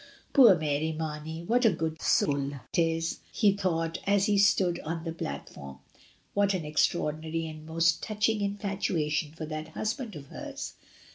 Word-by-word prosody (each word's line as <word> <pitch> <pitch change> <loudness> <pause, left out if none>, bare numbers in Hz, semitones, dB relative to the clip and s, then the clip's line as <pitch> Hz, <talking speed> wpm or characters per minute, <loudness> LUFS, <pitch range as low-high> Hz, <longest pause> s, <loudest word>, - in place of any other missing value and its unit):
Poor 235 -8 +8
Mary 155 0 0
Marney, 160 +1 -5
what 240 +7 +2
a 225 - +7
good 160 -3 -3
soul 140 -1 +2 0.2
it - - +2
is! 165 0 0
he 210 -3 +4
thought 165 -4 -1
as 200 -1 +4
he 210 -1 +2
stood 195 -3 +3
on 165 +1 -4
the 165 - -3
plat 70 - -5
form. 70 -1 -10 0.6
What 200 -1 +2
an 170 -4 -3
extraordinary 155 +1 0
and 155 -1 -8
most 165 +1 +2
touching 215 0 0
infatuation 190 -7 -1
for 160 0 -6
that 155 0 -5
husband 225 -1 -3
of 145 -2 -8
hers 290 -1 -6
165 Hz, 160 wpm, -29 LUFS, 155-200 Hz, 0.6 s, Poor